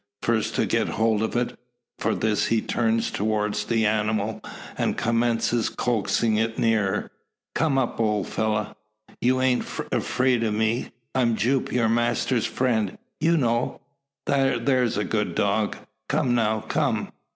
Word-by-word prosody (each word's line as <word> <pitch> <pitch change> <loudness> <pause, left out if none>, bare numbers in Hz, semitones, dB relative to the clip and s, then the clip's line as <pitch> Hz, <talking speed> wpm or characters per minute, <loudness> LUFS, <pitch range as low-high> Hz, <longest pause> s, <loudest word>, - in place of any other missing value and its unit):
First 115 -2 0
to - - +2
get - - +1
hold 110 -1 +1
of 110 - -2
it. 120 0 0 0.4
For - - 0
this 110 -1 +1
he 115 - +2
turns 115 0 0
towards 105 0 -1
the 115 0 +1
animal, 110 0 0 0.3
and - - -1
commences 115 0 +1
coaxing 115 -1 0
it 115 +1 0
nearer. 110 -4 +1 0.4
"Come 155 -4 +1
up, 125 -3 -1
ole 105 -3 +1
fella. 105 +1 -2 0.5
You 130 +1 +2
aint 130 -1 +2
afeerd 125 -2 0
o' 115 - +1
me. 110 +3 0 0.2
I'm 120 -3 +2
Jupe, 125 +5 0
your 120 -2 +2
master's 120 +1 +1
friend, 110 -6 0 0.2
ye 160 - +2
know. 120 -3 0 0.5
There's 130 -3 +2
a 105 - +1
good 105 +1 -1
dog! 100 +1 +1 0.3
Come 140 -4 +1
now; 110 -2 +1
come!" 110 - -1
115 Hz, 140 wpm, -25 LUFS, 110-120 Hz, 0.5 s, to